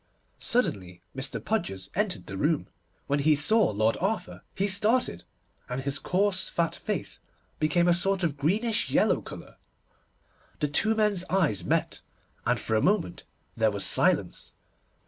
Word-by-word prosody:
Suddenly 95 - -1
Mr. 135 +1 -2
Podgers 130 - -3
entered 205 -1 -1
the 95 - -7
room. 150 - 0 0.4
When 145 +1 0
he 150 +2 +4
saw 205 +8 +3
Lord 110 +2 +1
Arthur 210 +4 -3
he 195 - 0
started, 210 - +2 0.4
and 125 +1 -3
his 140 +1 0
coarse, 190 +1 0
fat 170 -1 0
face - - -4 0.4
became 170 +3 +2
a 175 - +5
sort 195 +2 0
of 160 -4 0
greenish 210 +11 0
yellow - - +2
colour. - - -11 1.0
The 150 - 0
two 215 +10 +2
men's 210 -4 +2
eyes 165 - +1
met, - - -1 0.5
and - - +2
for 110 - -1
a 110 - +2
moment 190 - 0 0.3
there 110 -1 +2
was 100 -2 -1
silence. - - +1
170 Hz, 145 wpm, -27 LUFS, 135-200 Hz, 1.0 s, a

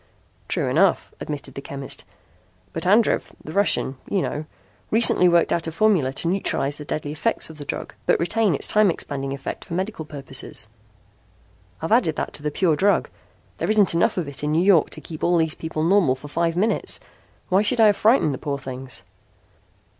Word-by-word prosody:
"True - - -1
enough," - - +2
admitted 145 -2 -6
the 140 - -6
chemist, 140 -1 -6 0.7
"but - - -3
Andrev, 215 +4 +3
the 155 - -8
Russian, 165 -7 +1
you 195 -3 +1
know, 150 +1 -3 0.4
recently 215 -5 +4
worked 170 -1 +3
out 170 -1 -1
a - - -2
formula 170 -7 +2
to 165 - -3
neutralize 155 -6 0
the 150 - -8
deadly 150 0 -3
effects 160 +3 0
of 155 - -14
the 145 - -7
drug - - -5
but - - +3
retain 190 +1 +1
its - - -2
time 215 -2 +4
expanding 135 -5 -3
effect 135 -1 -5
for 170 - -6
medical 190 -2 -3
purposes. 135 -6 -5 1.2
I've 160 - -2
added 220 -10 +3
that - - -3
to - - -7
the 150 - -1
pure 160 +1 +2
drug. 200 +6 +2 0.5
There - - -1
isn't 210 -4 +4
enough 170 +2 +2
of 170 -5 -1
it 140 0 -8
in 150 - 0
New 165 +3 +3
York 190 -6 +5
to 155 - -6
keep 155 -1 -9
all 175 0 +3
these 160 -1 +1
people 160 -1 -4
normal 170 -6 +4
for 135 +3 -11
five 165 +2 0
minutes. 210 +5 +2 0.5
Why 190 +1 +4
should 235 +3 +1
I 225 - +7
have 205 -1 +5
frightened 215 - +3
the 130 - -5
poor 145 -2 -3
things?" 130 -1 -6
165 Hz, 195 wpm, -23 LUFS, 145-195 Hz, 1.2 s, I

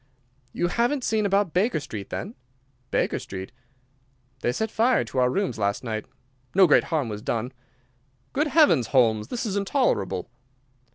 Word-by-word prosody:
"You 175 - -1
haven't 245 +7 0
seen 215 -3 +1
about 195 -4 +1
Baker 200 +1 +2
Street, 105 -8 -7
then?" 210 - -5 0.6
"Baker - - 0
Street?" 95 0 -7 0.9
"They 120 - 0
set 220 - -2
fire 240 +3 +3
to 130 - -3
our 125 0 +4
rooms 195 - -1
last 100 +2 0
night. 110 -3 -4 0.5
No 190 0 +7
great 155 - +4
harm 155 -6 -1
was 105 -1 -5
done." 120 +3 -2 0.8
"Good 300 +3 +1
heavens, 290 - +4
Holmes! 110 -5 +2
This 240 - -3
is 205 -3 -2
intolerable." 200 - 0
170 Hz, 155 wpm, -25 LUFS, -, 0.9 s, No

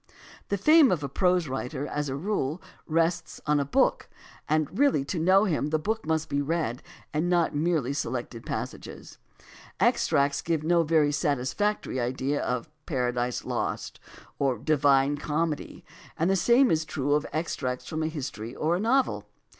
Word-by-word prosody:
The 200 - 0
fame 305 - +6
of 165 -5 0
a - - -1
prose 180 +3 +1
writer, 135 +2 -4
as 150 -1 -3
a 130 - -3
rule, 160 -2 -2 0.3
rests 165 +1 0
on 150 -1 +2
a - - +1
book, 140 - +1 0.4
and 155 - 0
really 275 - +3
to 170 - -3
know 190 +5 +5
him 160 -8 0
the 155 +1 +1
book 220 +4 -3
must 160 -1 0
be 140 0 -1
read 145 -5 -2 0.3
and 160 +4 0
not 175 -2 +2
merely 150 -3 0
selected 120 -4 -4
passages. - - -6 0.6
Extracts 140 0 +2
give 160 -2 -1
no 170 +1 +3
very 155 -2 +3
satisfactory 145 +4 -1
idea 130 +4 -1
of 125 +1 -2 0.2
Paradise 125 -4 -1
Lost - - -3 0.4
or 135 -3 +1
The - - -16
Divine 145 -2 +3
Comedy, 155 +1 -3 0.3
and 170 +4 +2
the - - +3
same 240 +7 +4
is 160 0 +2
true 145 -2 -1
of 150 +1 +1
extracts 130 -6 -3
from 155 - -3
a 155 - 0
history 130 -6 -6
or 160 +3 +1
a - - -1
novel. 255 +6 +1
155 Hz, 165 wpm, -27 LUFS, 140-170 Hz, 0.6 s, fame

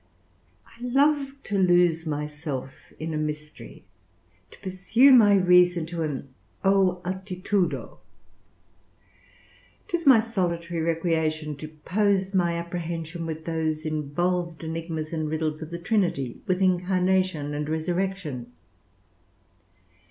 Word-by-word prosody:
I 235 - -20
love 275 +2 +2
to 200 -1 -1
lose 175 -3 +3
myself 150 -3 -5
in 160 0 -4
a - - -1
mystery, 150 0 -6 0.6
to - - -15
pursue 195 +8 +3
my 215 -6 +7
reason 180 -2 +4
to 170 0 -5
an 140 -4 -4 0.3
O 190 -2 +3
altitudo! 185 +1 -2 1.9
'Tis 340 -3 -2
my 260 -4 +9
solitary 175 -6 -2
recreation 160 -2 0
to 155 - -7
pose 190 +5 0
my 175 -3 +2
apprehension 170 -1 -4
with 160 0 -6
those 160 -1 -2
involved 165 +3 -1
enigmas 160 -1 -4
and 155 -2 -2
riddles 155 0 -2
of 160 - -6
the 170 - -5
Trinity, 170 - -1
with 185 +1 +1
Incarnation 185 -4 +1
and 150 +1 -3
Resurrection. 160 -6 -2
170 Hz, 110 wpm, -26 LUFS, 155-190 Hz, 1.9 s, my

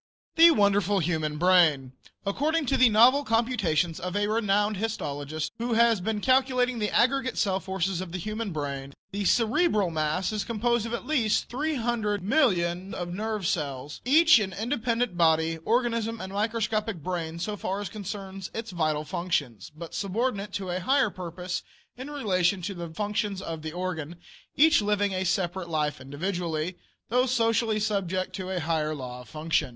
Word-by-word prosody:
THE 335 0 +9
WONDERFUL 200 - +3
HUMAN 155 -2 -1
BRAIN. 160 -7 +4 0.3
According 295 +10 0
to 270 - +1
the 255 -2 +6
novel 245 +6 +6
computations 210 - +1
of 180 +2 -4
a 205 0 +2
renowned 210 -1 +1
histologist, 155 -8 -3
who 235 +1 -1
has 230 -3 +4
been 210 +2 -2
calculating 255 -1 +2
the 210 -1 0
aggregate 260 +1 +1
cell 190 -2 +1
forces 190 -1 -2
of 185 -2 -6
the 185 - -3
human 215 +3 -4
brain, 140 -3 -5 0.2
the 200 0 -3
cerebral 220 - +2
mass 155 +4 -1
is 215 -1 -2
composed 235 0 0
of 235 - -2
at - - -7
least 250 -7 +1
300,000,000 215 - 0
of 175 -1 -4
nerve 215 0 -3
cells, 145 -3 -3
each 310 +2 +6
an 190 -3 -3
independent 230 -2 -1
body, 160 -1 +3
organism, 230 -1 0
and 190 +1 -7
microscopic 215 -3 -1
brain 170 -2 -3
so 205 +5 -3
far 195 0 -3
as 205 - -4
concerns 195 -1 -6
its 225 -1 -5
vital 155 -3 0
functions, 145 - -2
but 170 0 -8
subordinate 205 0 -2
to 195 -3 -3
a 180 - -1
higher 265 +3 +2
purpose 180 0 -5 0.3
in 260 +3 -8
relation 190 -9 0
to 200 +3 -3
the 170 -2 -6
functions 205 +1 -2
of 165 -3 -5
the 155 0 -5
organ; 175 -2 -4 0.4
each 310 -3 +5
living 205 -1 +1
a 185 0 -1
separate 180 -1 -1
life 150 -3 -1
individually, 165 +3 -3 0.3
though 250 +3 +2
socially 230 -3 +1
subject 190 -3 -1
to 185 -1 -5
a 185 -1 -1
higher 155 -1 -1
law 125 -3 -7
of 125 - -15
function. 155 -2 0
195 Hz, 165 wpm, -27 LUFS, 170-225 Hz, 0.4 s, THE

